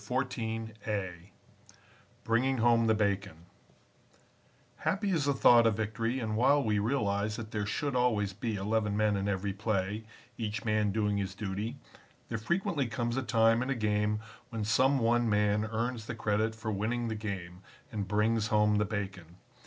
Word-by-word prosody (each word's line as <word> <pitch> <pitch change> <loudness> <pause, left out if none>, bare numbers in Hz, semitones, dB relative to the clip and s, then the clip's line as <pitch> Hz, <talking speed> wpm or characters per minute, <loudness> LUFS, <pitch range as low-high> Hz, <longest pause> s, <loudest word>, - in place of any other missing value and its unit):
CHAPTER 130 -1 -2 0.4
XIV 95 -4 -4 0.9
BRINGING 130 +4 +1
HOME 115 0 +4
THE 110 - +4
BACON 100 -5 -1 1.3
Happy 200 +1 0
is 160 -6 +1
the 140 - +2
thought 120 -3 +6
of 105 -2 +1
victory, 115 +3 -1
and 110 -3 -2
while 135 +5 +4
we 105 -3 +1
realize 105 -3 0
that 110 -1 -7
there 105 -1 -2
should 140 +4 -2
always 110 -6 +1
be 110 +3 -3
eleven 105 +1 0
men 105 -1 +2
in 100 0 -1
every 100 0 -1
play, 105 0 -1 0.4
each 110 0 -3
man 105 -2 +2
doing 105 -1 0
his 95 -1 -3
duty, 105 +5 -4 0.5
there 115 - -2
frequently 170 - 0
comes 120 0 -2
a 135 - 0
time 115 -2 +3
in 130 - -2
a 135 - +1
game, 105 -1 +1 0.3
when 115 -3 -3
some 130 +7 +3
one 120 -1 +2
man 105 0 +2
earns 115 +1 -3
the 120 - -4
credit 110 0 0
for 110 0 -4
winning 115 +4 -1
the 110 - -2
game, 95 -4 -5 0.3
and 105 -4 -3
brings 105 +2 +1
home 105 -2 +3
the 105 - +2
bacon. 95 -5 -5
110 Hz, 170 wpm, -31 LUFS, 105-120 Hz, 1.3 s, thought